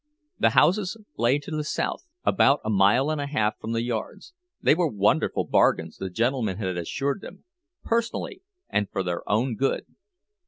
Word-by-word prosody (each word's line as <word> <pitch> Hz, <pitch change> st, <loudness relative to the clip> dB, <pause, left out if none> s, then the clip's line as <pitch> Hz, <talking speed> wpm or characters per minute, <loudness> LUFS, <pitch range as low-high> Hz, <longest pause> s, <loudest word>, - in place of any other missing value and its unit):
The -, -, +5 dB
houses 195 Hz, +3 st, +3 dB, 0.2 s
lay 120 Hz, +5 st, +2 dB
to 145 Hz, +2 st, -9 dB
the 155 Hz, -1 st, -2 dB
south, 150 Hz, -, -3 dB, 0.2 s
about 140 Hz, -6 st, +3 dB
a 110 Hz, -, 0 dB
mile 105 Hz, +9 st, +4 dB
and 155 Hz, -2 st, -2 dB
a 140 Hz, -, -3 dB
half 110 Hz, -7 st, 0 dB
from 110 Hz, -, -4 dB
the 115 Hz, 0 st, 0 dB
yards; 120 Hz, -, -5 dB, 0.3 s
they -, -, +4 dB
were 170 Hz, +1 st, +2 dB
wonderful 105 Hz, -3 st, +1 dB
bargains, -, -, +2 dB
the 95 Hz, -, -4 dB
gentleman 115 Hz, -1 st, 0 dB
had 95 Hz, -4 st, -2 dB
assured 135 Hz, -, -2 dB
them—personally, 345 Hz, -, -5 dB, 0.3 s
and 105 Hz, -, -1 dB
for 95 Hz, -, -2 dB
their 90 Hz, -1 st, -2 dB
own 115 Hz, +4 st, +1 dB
good. 135 Hz, +5 st, -1 dB
130 Hz, 165 wpm, -25 LUFS, 105-155 Hz, 0.3 s, The